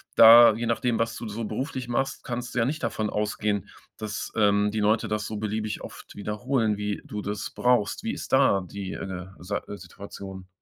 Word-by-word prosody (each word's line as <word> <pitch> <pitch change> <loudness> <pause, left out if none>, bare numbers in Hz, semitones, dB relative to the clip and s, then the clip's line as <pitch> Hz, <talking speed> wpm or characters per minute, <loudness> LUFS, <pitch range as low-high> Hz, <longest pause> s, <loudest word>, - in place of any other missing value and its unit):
da 115 0 +10
je 120 +1 -3
nachdem, 115 0 0
was 115 0 0
du 115 - -6
so 110 +2 -4
beruflich 130 0 -4
machst, 125 +3 -1
kannst 125 0 -4
du 125 - 0
ja 115 - +3
nicht 155 +4 -3
davon 105 -1 -1
ausgehen, 105 -1 -1 0.3
dass, 105 -1 -5
ähm, 105 -1 +3
die 110 - -2
Leute 110 +2 +2
das 105 0 -2
so 110 - -4
beliebig 110 0 -3
oft - - -10
wiederholen, 110 +2 0
wie 105 -1 -3
du 105 -1 -5
das 100 0 -4
brauchst. 125 - +1
Wie 225 - -1
ist - - -7
da 130 -8 +4
die, 100 0 -6
äh, 95 -1 -6
Sei 100 +3 -3 0.2
Situation? 95 -2 -10
105 Hz, 190 wpm, -26 LUFS, 105-120 Hz, 0.3 s, da